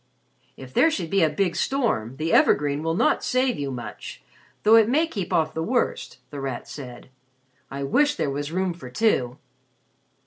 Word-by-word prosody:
"If 130 -1 -11
there 325 - +5
should 175 - -4
be 195 - +3
a 160 - +4
big 175 +3 -1
storm, 170 - -1
the 160 +2 -1
evergreen 145 0 +3
will 165 +1 -1
not - - +2
save 255 - +1
you 140 -1 -2
much, 125 -2 -8 0.4
though 220 +2 +6
it 225 -1 +5
may 305 +6 +3
keep 200 - -5
off 155 -1 +1
the 160 - -3
worst," 240 +8 -1
The 145 - -6
Rat 135 -3 -5
said. 125 -4 -10 0.6
"I 140 0 -5
wish 290 - +2
there 145 - -1
was 145 +2 -4
room 185 +1 -1
for 160 -7 -10
two." 125 - +1
160 Hz, 180 wpm, -24 LUFS, 140-220 Hz, 0.6 s, though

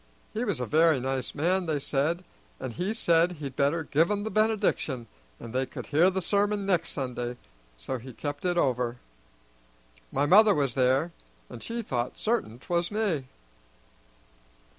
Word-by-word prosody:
He 225 - -1
was 200 - -1
a 125 - -1
very 155 +2 +4
nice 130 0 -3
man, 175 +4 +1
they 155 -2 +1
said, 150 +5 -1 0.4
and 120 - -5
he 180 - -2
said 175 -5 +3
he'd 140 -5 -7
better 145 +4 +1
give 160 +3 +2
'em 205 -1 0
the 220 - -3
benediction, 215 - +1 0.3
and 115 - -9
they 130 +1 0
could - - -7
hear 160 +5 +4
the 190 -1 -2
sermon 205 +1 +1
next 180 -4 +1
Sunday, 125 -3 -4 0.4
so 120 - -4
he 130 +3 -10
kept 145 +4 -5
it 180 -1 0
over. 125 -5 +1 1.1
My 145 - +1
mother 210 +6 +7
was 140 -4 0
there, 135 +6 +2 0.4
and 115 - -9
she 230 0 -4
thought 125 - -2
certain 215 - -1
'twas 170 +6 -1
me." 200 -11 -1
155 Hz, 160 wpm, -28 LUFS, 130-190 Hz, 1.1 s, mother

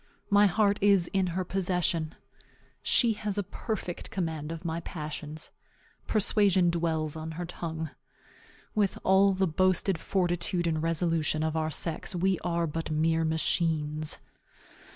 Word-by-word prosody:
My 205 0 +6
heart 200 +1 +2
is 195 -4 +4
in 190 -1 +2
her 180 +2 -1
possession. 175 -3 -1 0.7
She 235 -3 +3
has 210 -1 -3
a 205 - +1
perfect 195 -2 -5
command 160 -4 -3
of 165 +1 -7
my 165 0 -1
passions. 155 -1 -6 0.6
Persuasion 195 -4 +3
dwells 160 -3 -1
on 160 0 -5
her 175 +2 -4
tongue. 160 -3 -5 0.8
With 205 -2 +1
all 195 +1 +5
the 190 0 +1
boasted 185 +1 +2
fortitude 175 -1 0
and 160 -2 0
resolution 165 -2 +1
of 160 0 -1
our 155 -1 0
sex, 165 +3 -2
we 185 +1 +1
are 170 -1 0
but 165 +1 -3
mere 160 +1 +2
machines. 155 -1 0
170 Hz, 135 wpm, -29 LUFS, 160-190 Hz, 0.8 s, My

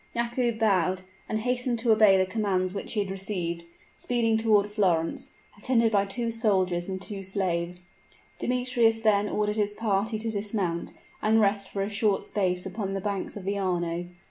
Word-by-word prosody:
Yakoub 235 0 0
bowed, 185 -4 +2 0.3
and 215 0 -1
hastened 245 0 0
to 230 0 +3
obey 215 -3 +6
the 190 - +3
commands 185 -2 -1
which 200 - -5
he 210 - +1
had 195 -1 -3
received 180 -4 -3 0.3
speeding 230 -2 +1
toward 220 -2 +3
Florence, 175 -6 0 0.3
attended 230 0 +2
by 200 -2 +3
two 230 +3 -1
soldiers 190 -6 0
and 190 0 -3
two 195 +1 -5
slaves. 180 -2 -2 0.5
Demetrius 245 -2 +2
then 210 -2 +3
ordered 210 0 0
his 205 -1 0
party 215 0 0
to 225 +1 -2
dismount 200 -5 -2 0.3
and 220 +1 +3
rest 200 -2 +1
for 195 - -2
a - - -2
short 205 -1 +1
space 180 -3 0
upon 195 0 -4
the - - -1
banks 200 +1 -3
of 190 - -8
the 200 +1 -1
Arno. 175 -2 -1
205 Hz, 170 wpm, -27 LUFS, 185-225 Hz, 0.5 s, obey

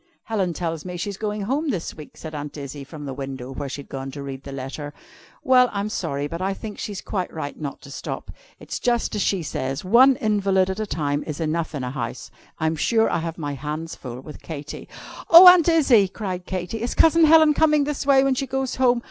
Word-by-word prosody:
"Helen 195 -5 -1
tells 165 -1 -3
me 180 -1 -6
she's 200 +3 -4
going 210 +1 -3
home 285 +8 -1
this 185 -10 -3
week," 150 - -12
said 160 -1 -8
Aunt 145 0 -6
Izzie, 140 0 -7
from 145 +1 -9
the 135 - -5
window, 135 -1 -6
where 140 0 -5
she 140 +2 -5
had - - -25
gone 135 0 -5
to 140 +1 -7
read 135 -1 -6
the 140 - -9
letter. 135 +2 -6 0.5
"Well, 255 -3 +5
I'm 205 +1 -2
sorry, 145 -9 -2
but 165 +4 -5
I 195 +1 -1
think 210 0 -8
she's 205 -3 -5
quite 185 -4 -3
right 150 -3 -5
not 140 -2 -5
to 140 0 -12
stop. - - -6 0.3
It's - - -6
just 240 -1 0
as 210 - -1
she 195 -3 0
says: 135 +1 -4
one 255 +7 +6
invalid 195 -4 +1
at 190 - -5
a 215 - -2
time 145 -5 -1
is 150 -1 -5
enough 160 0 -2
in 135 - -3
a 125 - -3
house. 120 -4 -5 0.3
I'm 160 0 0
sure 225 +8 +2
I - - +1
have 165 0 -5
my 145 -3 -4
hands 150 +4 -5
full 125 -1 -8
with 150 +2 -11
Katy." 150 -2 -8 0.4
"Oh, 340 +2 +11
Aunt 360 -2 +8
Izzie!" 270 -11 +5
cried 185 -2 -5
Katy, 185 +4 -4
"is 240 - -2
Cousin 325 0 +5
Helen 315 -1 +6
coming 305 -1 +3
this 290 0 -2
way 275 -1 +5
when 275 -1 +2
she 270 +1 -2
goes 265 0 -2
home? 250 -2 +3
180 Hz, 230 wpm, -23 LUFS, 145-235 Hz, 0.5 s, Oh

